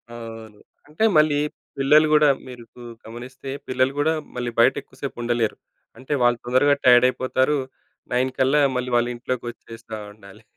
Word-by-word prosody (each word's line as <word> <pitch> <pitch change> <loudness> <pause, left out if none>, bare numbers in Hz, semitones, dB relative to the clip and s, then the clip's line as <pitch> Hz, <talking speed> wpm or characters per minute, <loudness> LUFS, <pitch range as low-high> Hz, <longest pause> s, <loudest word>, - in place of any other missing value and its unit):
అవును. 115 -2 -10 0.3
అంటే, 155 +8 -3
మళ్ళీ 150 -1 +4 0.4
పిల్లలు 150 +3 +5
గూడా 150 -1 +5 0.2
మీరు 125 -2 -10
కు 125 - -13 0.2
గమనిస్తే 125 +4 -9 0.2
పిల్లలు 130 +1 +1
గూడా 155 +2 +2 0.2
మళ్ళీ 120 -1 -3
బయటెక్కువ 130 +2 +1
సేపుండలేరు. 120 -4 -2 0.4
అంటే, 130 +3 -5
వాళ్ళు 120 0 +3
తొందరగా 130 +4 +3
టైడయిపోతారు. 130 +3 +3 0.6
9 130 +1 +1
కల్లా 135 +3 +3
మళ్ళీ 125 0 -2
వాళ్ళింట్లోకొచ్చేస్తా 120 -1 -4 0.2
ఉండాలి. 105 +1 -16
125 Hz, 125 wpm, -22 LUFS, 120-135 Hz, 0.6 s, పిల్లలు